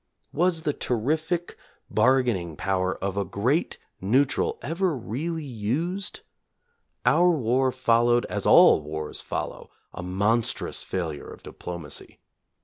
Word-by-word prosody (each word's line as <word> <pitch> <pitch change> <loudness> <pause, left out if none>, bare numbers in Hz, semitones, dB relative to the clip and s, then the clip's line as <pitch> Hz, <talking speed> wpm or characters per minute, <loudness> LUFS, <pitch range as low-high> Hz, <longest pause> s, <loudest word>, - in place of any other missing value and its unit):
Was 165 0 +1
the 150 - 0
terrific 155 +10 -1 0.3
bargaining 110 -8 +2
power 95 -1 0
of 100 0 -2
a 100 - +1
great 110 - 0 0.2
neutral 125 +8 +2
ever 170 0 0
really 155 +8 -4
used 145 - -3 0.8
4? - - +5
Our 175 +1 +5
war 130 -4 +2
followed, 120 -1 +3
as - - -2
all - - +7
wars 75 0 -5
follow, - - -5 0.2
a - - -6
monstrous 100 +6 0
failure 80 -6 -4
of - - -13
diplomacy. 85 -4 -7
120 Hz, 120 wpm, -26 LUFS, 95-155 Hz, 0.8 s, all